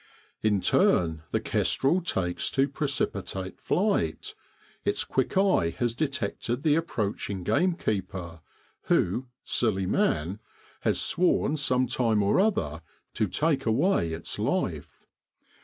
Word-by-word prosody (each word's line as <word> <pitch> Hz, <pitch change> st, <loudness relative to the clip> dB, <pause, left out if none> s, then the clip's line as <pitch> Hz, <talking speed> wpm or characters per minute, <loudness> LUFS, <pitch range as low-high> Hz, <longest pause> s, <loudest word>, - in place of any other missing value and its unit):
In 105 Hz, -3 st, +2 dB
turn 80 Hz, -4 st, +3 dB
the -, -, 0 dB
kestrel 165 Hz, +8 st, +1 dB
takes 90 Hz, -, -1 dB
to 135 Hz, +1 st, +4 dB
precipitate 100 Hz, -11 st, -3 dB
flight; 185 Hz, -, 0 dB, 0.5 s
its -, -, +1 dB
quick 130 Hz, +7 st, -1 dB
eye 190 Hz, -, +3 dB
has 120 Hz, -2 st, 0 dB
detected 125 Hz, -2 st, -2 dB
the 155 Hz, -3 st, +4 dB
approaching 105 Hz, -, -2 dB
gamekeeper, 95 Hz, -, -1 dB, 0.5 s
who, 120 Hz, +9 st, +1 dB, 0.2 s
silly 100 Hz, -5 st, +1 dB
man! 90 Hz, +2 st, 0 dB, 0.4 s
has -, -, +1 dB
sworn, 175 Hz, -3 st, +2 dB
some 130 Hz, -3 st, +2 dB
time 115 Hz, -4 st, +1 dB
or 100 Hz, -, +3 dB
other, 85 Hz, -, 0 dB, 0.3 s
to 110 Hz, -, 0 dB
take 135 Hz, -, 0 dB
away 115 Hz, -, +2 dB
its 80 Hz, +1 st, -5 dB
life. -, -, -2 dB
115 Hz, 115 wpm, -27 LUFS, 95-150 Hz, 0.5 s, to